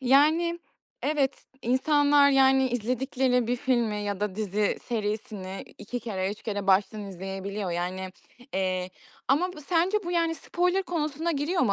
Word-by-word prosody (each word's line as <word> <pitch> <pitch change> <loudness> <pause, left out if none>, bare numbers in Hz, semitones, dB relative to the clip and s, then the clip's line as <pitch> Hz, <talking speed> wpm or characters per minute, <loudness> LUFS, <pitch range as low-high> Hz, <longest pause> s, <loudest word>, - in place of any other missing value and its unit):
yani, 310 +6 +4 0.4
evet, 285 -2 +1 0.3
insanlar, 285 +3 +4
yani, 265 -1 +5
izledikleri 250 +1 0
bir 245 +2 0
filmi 240 -4 +1
ya 205 -1 -3
da 210 -2 -1
dizi 210 -1 0
serisini 210 -4 -3
2 245 +4 -5
kere, 190 -5 -2
3 205 - -8
kere 205 -3 -3
baştan 200 +2 +2
izleyebiliyor, 195 +1 -5
yani. 185 +2 -3 0.4
Eee, 185 -1 -1 0.4
ama 350 +7 +2
bu 310 - -10
sence 350 +6 +2
bu, 350 - -3
yani, 335 -1 +1
spoiler 360 +3 0
konusuna 325 -2 -2
giriyor 315 +5 0
mu 205 - +3
245 Hz, 145 wpm, -27 LUFS, 200-295 Hz, 0.4 s, yani